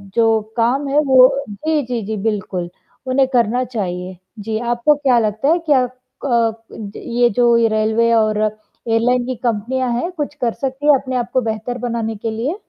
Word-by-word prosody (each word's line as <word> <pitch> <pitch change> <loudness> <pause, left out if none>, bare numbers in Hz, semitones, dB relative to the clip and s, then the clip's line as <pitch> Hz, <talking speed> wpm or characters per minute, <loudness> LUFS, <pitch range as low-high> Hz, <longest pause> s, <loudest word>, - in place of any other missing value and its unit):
जो 225 -1 +3 0.2
काम 260 +5 +1
है 285 +2 +2
वो 265 +1 +5
जी, 305 +8 -1
जी, 240 -2 -2
जी 220 +1 -3
बिल्कुल 190 -5 -2 0.4
उन्हें 260 +1 +2
करना 240 +1 +2
चाहिए। 185 -6 -4 0.2
जी, 215 +1 -3
आपको 240 +5 +2
क्या 270 -4 +2
लगता 215 +4 -1
है 340 +2 +3
क्या 260 -3 +5
अ, 250 -2 -2 0.4
ये 240 0 +1
जो 240 -1 +5 0.2
रेलवे 220 +2 +2
और 215 -2 +2
एयरलाइन 225 +3 -1
की 255 0 -3
कंपनियाँ 240 +3 -1
हैं, 355 - -3
कुछ 295 -4 -4
कर 235 -2 +1
सकती 270 +2 -4
है 295 - +8
अपने 260 -1 -5
आप 240 - -2
को 255 - +3
बेहतर 225 +2 -3
बनाने 230 -2 -3
के 220 +2 -4
लिए? 240 +10 -2
240 Hz, 175 wpm, -18 LUFS, 220-260 Hz, 0.4 s, है